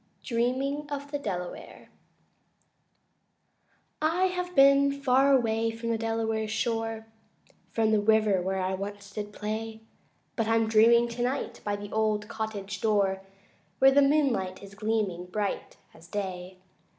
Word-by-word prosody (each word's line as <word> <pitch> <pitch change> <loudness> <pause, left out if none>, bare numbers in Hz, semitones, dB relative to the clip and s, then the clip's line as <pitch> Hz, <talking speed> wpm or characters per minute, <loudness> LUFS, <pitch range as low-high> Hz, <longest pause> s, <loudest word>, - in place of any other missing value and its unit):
Dreaming 265 +5 -1
of 285 0 -5
the 290 - -2
Delaware 180 -8 -6 2.1
I 325 +4 +1
I - - +6
have 360 0 -4
been 275 0 +6
far 275 0 +3
away 230 -3 +2
from 230 +1 -5
the 225 - 0
Delaware's 225 -1 -1
shore, 225 0 -2 0.6
From 220 -1 +1
the 215 - +4
river 210 -2 +3
where 190 0 -1
once 200 +1 -7
I 210 - -1
did 205 0 -9
play, 220 +1 -5 0.5
But 225 -2 -1
I'm 225 0 +2
dreaming 230 +2 +5
tonight 245 +3 -3
by 205 -1 -1
the 205 0 -8
old 215 -1 0
cottage 210 -3 -5
door 200 -3 +1 0.6
Where 270 0 +6
the 285 +1 +5
moonlight 270 -11 +1
is 200 0 -11
gleaming 200 -4 -2
bright 205 +2 -3 0.2
as 165 +1 -16
day. 185 -2 -5
220 Hz, 140 wpm, -28 LUFS, 205-250 Hz, 2.1 s, I